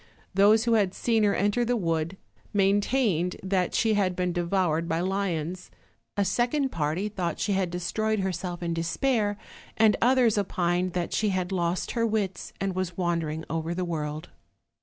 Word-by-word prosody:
Those 205 +3 +5
who 235 -1 +2
had 200 -4 +2
seen 230 -2 +1
her 200 - +2
enter 205 +5 +1
the 245 +1 +1
wood 165 -1 -1 0.4
maintained 200 -2 +2
that 190 -2 0
she 225 -2 +3
had 190 -3 +1
been 180 -1 -1
devoured 170 -2 0
by 160 - 0
lions; 180 -2 -2 0.5
a 200 - +2
second 240 - +1
party 160 +5 -1
thought 180 -6 -3
she 205 - 0
had 190 -2 0
destroyed 215 +5 -1
herself 180 -1 -3
in 170 -1 -1
despair; 205 +5 0 0.4
and 220 -1 +5
others 240 -3 +4
opined 180 -2 0
that 175 -1 -2
she 215 - +1
had 185 -1 -1
lost 175 -1 -1
her 230 -1 +1
wits, 205 -4 -2
and 195 0 -1
was 185 -2 -3
wandering 165 -3 -1
over 165 +1 -2
the 180 0 -1
world. 155 -2 -4
185 Hz, 165 wpm, -27 LUFS, 170-210 Hz, 0.5 s, Those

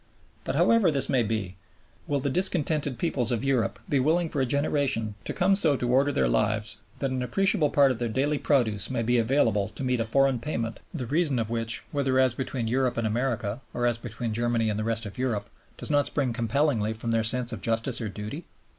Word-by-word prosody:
But - - -2
however 230 -6 +4
this 140 -3 +2
may 130 - +3
be, 105 -5 -3 0.5
will 145 -1 0
the 140 - -1
discontented 155 -6 0
peoples 125 -5 +1
of 120 0 -1
Europe 130 -7 0
be 140 - +1
willing 165 +5 +1
for 145 - -2
a 130 - +1
generation 140 -6 0
to - - -2
come 195 +2 +2
so 150 -7 +4
to 125 -1 -1
order 135 +3 +3
their - - +1
lives 105 -1 0 0.2
that 135 -2 -2
an 130 -1 -2
appreciable 180 - +1
part 140 -2 +4
of 120 - -4
their 120 -1 -1
daily 140 +5 0
produce 110 - +1
may 125 -3 -1
be 120 +1 +2
available 110 -4 +1
to 110 - -8
meet 125 -1 0
a - - +1
foreign 135 +2 +2
payment, 115 -3 -4
the 145 -8 -4
reason 145 +1 0
of 115 -1 -2
which, 115 -1 -2
whether 135 -4 0
as 130 -2 +4
between 125 -2 -3
Europe 125 +1 0
and 115 - 0
America, 115 0 -2
or 120 - 0
as 120 -1 +1
between 115 -1 -5
Germany 115 -1 0
and 105 - -3
the - - -1
rest 115 0 +2
of 105 +3 -7
Europe, 120 -5 -2 0.3
does - - +1
not 145 -1 +3
spring 130 -5 -1
compellingly 115 -1 0
from 115 +1 -4
their 115 -1 +1
sense 120 +1 -1
of 105 - -6
justice 115 +4 +1
or 110 - -3
duty? 105 - -7
125 Hz, 220 wpm, -26 LUFS, 115-140 Hz, 0.5 s, however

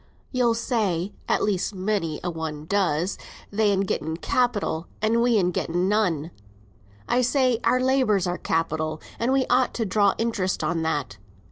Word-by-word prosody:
"You'll 245 -3 +2
say 205 -6 -1 0.2
(at - - +2
least 200 0 0
many 185 -5 -1
a 175 - -1
one 155 -2 -5
does), 180 -1 0 0.3
they'n 205 -2 +2
getten 160 -4 -2
capital 205 -7 0
an' 225 +2 +2
we'n 220 -7 +3
getten 175 +1 -1
none. 180 -7 +1 0.8
I 250 - +2
say, 255 -1 +2
our 255 - +3
labour's 255 -7 +2
our 175 0 -2
capital 155 -1 -1 0.2
and 235 +3 +1
we 265 -1 +3
ought 255 -1 +2
to 230 - -1
draw 200 0 +3
interest 225 -5 -1
on 165 -1 0
that. 145 -8 -2
200 Hz, 150 wpm, -25 LUFS, 165-230 Hz, 0.8 s, we'n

